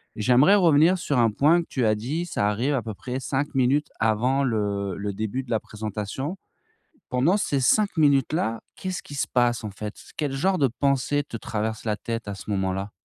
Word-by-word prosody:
J'aimerais 125 - +5
revenir 170 -1 +5
sur 145 -6 0
un 115 -1 +4
point 155 +10 +3
que 165 - -10
tu 125 -4 0
as 110 0 +3
dit. 145 +11 -3
Ça 105 -11 0
arrive 120 +8 0
à 130 - 0
peu 110 -2 -6
près 125 +4 -5
5 140 +3 -2
minutes 135 +3 +2
avant 120 +5 +2
le 100 -5 -1
le 100 0 -3
début 110 +6 -3
de 125 - -11
la 110 - +2
présentation. 110 - -5 0.7
Pendant 135 +10 +3
ces 140 -9 0
5 200 +8 +2
minutes-là, 140 -5 +2 0.2
qu'est-ce 185 -1 -4
qui 145 - -11
se - - 0
passe 120 -2 +1
en 105 - -4
fait? 105 +2 -7 0.2
Quel 145 -3 -2
genre 185 +7 +1
de 135 -4 +3
pensées 140 +3 0
te 120 - -7
traverse 110 0 -3
la 105 -2 0
tête 115 +1 -5
à 100 - -3
ce 100 - -11
moment-là? 95 0 -1
125 Hz, 200 wpm, -25 LUFS, 110-145 Hz, 0.7 s, J'aimerais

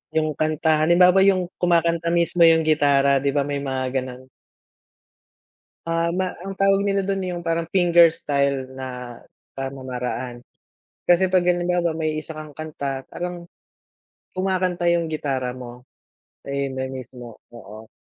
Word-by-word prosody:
Yung 155 -1 +1
kanta, 155 +1 +1
halimbawa, 180 +3 +5
yung 190 -2 +3 0.2
kumakanta 170 -1 +2
mismo 170 0 +1
yung 165 -1 +6
gitara, 140 -3 +3
di 140 - +1
ba, 140 0 0
may 145 -1 -3
mga 130 -1 -3
gano'n? 130 0 -10 1.6
Ah, 165 0 0
ma 185 +1 -2
ang 195 0 -6
tawag 195 0 +3
nila 200 -1 +1
do'n 195 -1 -1
yung 175 - -5
parang 165 0 0
finger 175 -3 +5
style 140 -4 -1
na 125 -2 -7 0.4
pamamaraan. 125 -2 -5 0.6
Kasi 180 +1 +4
pag 185 -1 +3
halimbawa 175 -2 +1
may 155 -1 -2
isa 155 +1 -8
kang 155 -1 -8
kanta 140 -4 -5
parang, 175 -1 -6 0.9
kumakanta 185 -2 -1
yung 170 -1 +1
gitara 135 -5 -2
mo. 125 -1 -10 0.6
Eh, 140 0 -2
'yon 130 - -7
na 130 - -2
mismo 125 -3 -9 0.2
oo, 110 0 -12
155 Hz, 140 wpm, -22 LUFS, 135-175 Hz, 1.6 s, yung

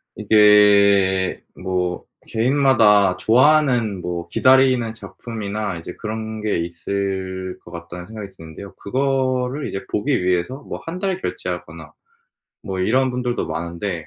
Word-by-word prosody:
이게 100 -3 +4 0.2
뭐 90 -1 -2 0.2
'개인마다 110 -6 +3
좋아하는 125 -4 +3
뭐 85 -1 -4
기다리는 130 +1 +3
작품이나 105 -4 -5
이제 85 +1 -8
그런 110 0 -5
게 105 -3 0
있을 95 +1 -4
것 85 - -12
같다.'는 85 +1 -9
생각이 105 -3 -8
드는데요. 80 +5 -11
그거를 130 +2 -1
이제 95 0 -6
보기 125 -2 0
위해서 90 +10 -1
뭐 - - -7
1 170 +3 -5
달 190 -2 -1
결제하거나 - - -6 0.7
뭐 95 -3 -5
이런 130 +7 +2
분들도 125 -1 -2
많은데 85 0 -4
105 Hz, 275 characters per minute, -21 LUFS, 95-125 Hz, 0.7 s, 이게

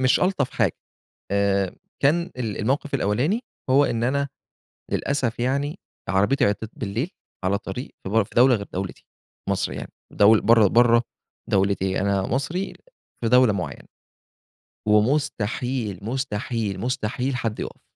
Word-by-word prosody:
مش 130 0 +3
ألطف 180 -8 +1
حاجة، - - +1 0.5
آآ، 100 -1 +1 0.3
كان 170 +5 +3
ال 115 -5 -3
الموقِف 135 +6 -1
الأولاني 135 - +1 0.3
هو 140 +2 +6
إن 115 -3 -1
أنا- 140 +3 +1 0.6
للأسف 135 -5 0
يعني- 140 +7 -1 0.3
عربيتي 105 +8 +3
عطلت 110 0 -1
بالليل 120 - -2 0.3
على 100 +2 +2
طريق 100 +5 -6
في - - -4
بر 110 +2 +3
في - - -18
دولة 125 +2 +6
غير 100 -3 -3
دولتي- 95 0 -5 0.5
مصر - - 0
يعني- - - -7 0.2
دول 105 +1 +6
برّا 115 -2 +6
برّا 120 +2 +5 0.5
دولتي، 95 -1 +1
أنا 100 0 +1
مصري 140 - -2 0.5
في - - +3
دولة 125 -2 +6
معيّنة، 95 -3 -5 1.0
ومستحيل، 115 - +1
مستحيل، 115 -3 -2
مستحيل، 125 +2 -1
حد 115 -2 -2
يقف، - - -6
115 Hz, 135 wpm, -24 LUFS, 100-135 Hz, 1.0 s, هو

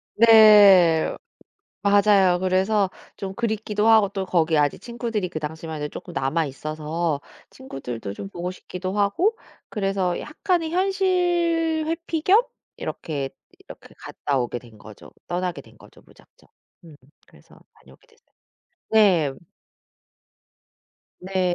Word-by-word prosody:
네. 205 -7 +6 0.7
맞아요. 200 -3 +4
그래서 190 +2 +1 0.3
좀 195 -1 -6
그립기도 220 -2 -1
하고 220 -2 +6
또 195 -1 -4
거기 165 -3 +1
아직 145 -1 +1
친구들이 235 -5 -4
그 160 - -5
당시만 160 0 -6
해도 150 - -3
쪼끔 - - -9
남아 135 +4 0
있어서 155 +2 -3 0.3
친구들도 125 - -7
좀 195 - -8
보고 180 -1 -5
싶기도 185 +1 -6
하고 335 - +1 0.3
그래서 195 -4 -1
약간의 330 0 -2
현실 350 -4 +1
회피 330 0 -3
겸 390 +8 +5 0.4
이렇게 140 -5 -5 0.3
이렇게 - - -14
갔다 140 - -3
오게 120 0 -3
된 115 -2 -17
거죠. 105 0 -14 0.2
떠나게 180 0 -3
된 - - -20
거죠 - - -18
무작정. - - -24 0.4
음 160 -3 -14 0.3
그래서 - - -21 0.2
다녀오게 - - -21
됐어요. 460 -1 -31 0.6
네. 190 -10 +4 1.9
네. 185 -1 -1
195 Hz, 260 characters per minute, -23 LUFS, 160-230 Hz, 1.9 s, 네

